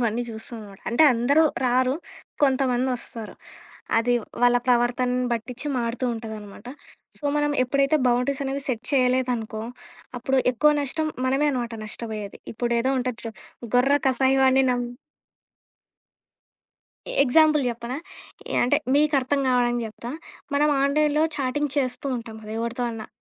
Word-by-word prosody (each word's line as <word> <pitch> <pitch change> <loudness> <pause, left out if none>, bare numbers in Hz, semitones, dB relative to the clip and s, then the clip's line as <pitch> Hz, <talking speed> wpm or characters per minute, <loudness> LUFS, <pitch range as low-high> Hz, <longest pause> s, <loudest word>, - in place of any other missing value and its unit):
ఇవన్నీ 235 0 0
చూస్తున్నావనమాట. 220 -3 -9
అంటే 240 - +4
అందరూ 280 +7 +3 0.2
రారు, 255 +1 +2 0.5
కొంతమందొస్తారు. 255 -4 -1 0.7
అది 245 +2 +1 0.3
వాళ్ళ 245 0 +5
ప్రవర్తనను 250 +1 +2
బట్టిచ్చి 245 +5 -5
మారుతూ 235 +1 -2
ఉంటదనమాట. 220 -2 -9 0.5
సో, - - -23
మనం 295 0 +1
ఎప్పుడైతే 275 +3 +2
బౌండరీసనేవి 270 +3 0
సెట్ 235 -3 -2
చేయలేదనుకో, 250 -4 +1 0.6
అప్పుడు 265 +2 +1
ఎక్కువ 300 +5 +4
నష్టం 310 +3 -1 0.2
మనమే 275 +3 +2
అనమాట 240 -3 -3
నష్టపోయేది. 215 -2 -6 0.2
ఇప్పుడేదో 235 +2 0
ఉంటది 250 -2 -3
చూడు, 225 -1 -6 0.4
గొర్రె 275 +3 +4
కసాయివాడిని 265 0 +4
నమ్ 245 0 -1 2.4
ఎగ్జాంపుల్ 305 +2 +4
చెప్పనా? 235 +2 -5 0.6
యాహ్! - - +2
అంటే 245 - +3 0.2
మీకర్థం 285 -2 +2
కావాడానికి 240 -1 +2
చెప్తా. 230 +2 -8 0.4
మనం 295 +1 +3
ఆన్‌లైన్‌లో 300 +2 +2
చాటింగ్ 285 +1 -1
చేస్తూ 260 0 -1
ఉంటాం 230 -2 -8
కదా 215 0 -8
ఎవరితో 235 +2 -3
అన్నా, 225 -2 -7
250 Hz, 115 wpm, -24 LUFS, 235-275 Hz, 2.4 s, వాళ్ళ